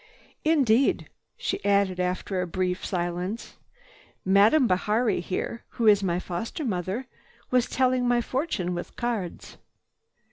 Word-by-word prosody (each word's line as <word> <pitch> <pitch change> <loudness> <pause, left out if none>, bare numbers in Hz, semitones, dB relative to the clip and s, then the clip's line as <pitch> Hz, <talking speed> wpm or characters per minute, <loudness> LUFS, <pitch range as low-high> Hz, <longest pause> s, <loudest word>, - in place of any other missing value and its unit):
"Indeed," 275 -6 +3 0.3
she - - -3
added 200 -2 +2
after 180 +1 -1
a 180 - -2
brief 180 +1 -2
silence, 180 +4 -3 0.7
"Madame 205 +9 +5
Bihari 210 +3 +1
here, 185 +6 -4
who 235 - +1
is 205 -2 +6
my 175 -3 0
foster 185 - -4
mother, 195 +3 -2 0.5
was 250 -1 +2
telling 255 -1 +2
my 245 0 +3
fortune 240 - -2
with 175 - -6
cards." 225 -8 -4
200 Hz, 120 wpm, -26 LUFS, 180-240 Hz, 0.7 s, is